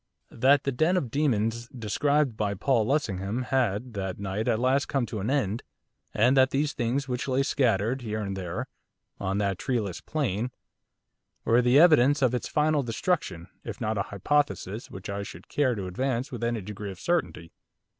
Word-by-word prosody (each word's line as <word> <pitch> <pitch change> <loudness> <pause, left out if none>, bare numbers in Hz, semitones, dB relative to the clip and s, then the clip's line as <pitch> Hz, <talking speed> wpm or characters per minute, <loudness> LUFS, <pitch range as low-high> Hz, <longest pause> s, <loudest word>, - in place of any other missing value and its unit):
That 135 +4 +4
the 140 - 0
den 160 +8 +2
of 130 -10 -2
demons 115 -5 0
described 135 +3 0
by 105 -2 -1
Paul 110 +1 +1
Lessingham, 115 -5 -1
had, 125 -3 0
that 95 -2 -3
night, 100 +3 -3
at 115 -3 +2
last 130 +4 +2
come 135 -3 0
to 110 - -5
an 100 - -2
end, 125 -6 0 0.5
and 120 +5 +3
that 130 -1 +5
these 145 +2 0
things 125 +4 -1
which 125 0 -3
lay 135 +1 +2
scattered, 125 -2 +1
here 110 -2 -3
and 100 -2 -3
there, 95 +7 -4 0.5
on 95 +1 -1
that 100 -2 0
treeless 105 -9 -2
plain, 125 -6 -1 1.0
were 115 +2 +4
the 125 +2 +4
evidences 145 -4 +6
of 125 -1 +3
its 125 - -2
final 150 -1 +2
destruction, 115 - -2 0.2
is - - -7
not 110 -2 -1
a - - -3
hypothesis 110 -1 -1
which 95 - -8
I 100 0 -3
should 90 -3 -10
care 130 -4 +1
to 100 -3 -4
advance 125 +7 -2
with 120 -2 -5
any 115 -2 0
degree 105 +1 -6
of 95 -2 -9
certainty. 150 - -1
120 Hz, 180 wpm, -27 LUFS, 100-135 Hz, 1.0 s, evidences